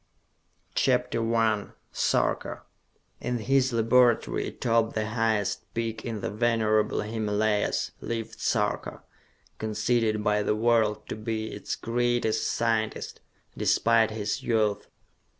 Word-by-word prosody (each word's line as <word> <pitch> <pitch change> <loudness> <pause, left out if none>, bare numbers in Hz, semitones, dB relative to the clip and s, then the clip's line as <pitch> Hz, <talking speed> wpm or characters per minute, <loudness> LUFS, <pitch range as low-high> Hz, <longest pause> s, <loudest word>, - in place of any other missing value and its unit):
_ - - -35
CHAPTER 115 - +1
I 110 -2 +2 0.2
Sarka - - 0 0.6
In 125 - -2
his 130 +3 +2
laboratory 120 +1 +3
atop 115 -1 0
the 110 0 0
highest 110 -3 -1
peak 115 -1 -3
in 115 -4 -4
the - - -3
venerable 110 -1 +1
Himalayas, 105 -1 0
lived 115 -1 -5
Sarka, - - -1 0.6
conceded 110 0 0
by 105 0 +2
the 105 - +1
world 110 -1 +2
to - - -3
be 110 0 -4
its - - -4
greatest 120 -2 0
scientist, 110 -2 -1 0.3
despite 115 -1 +3
his 105 -1 -3
youth. 110 -3 0
110 Hz, 115 wpm, -27 LUFS, 110-115 Hz, 0.6 s, laboratory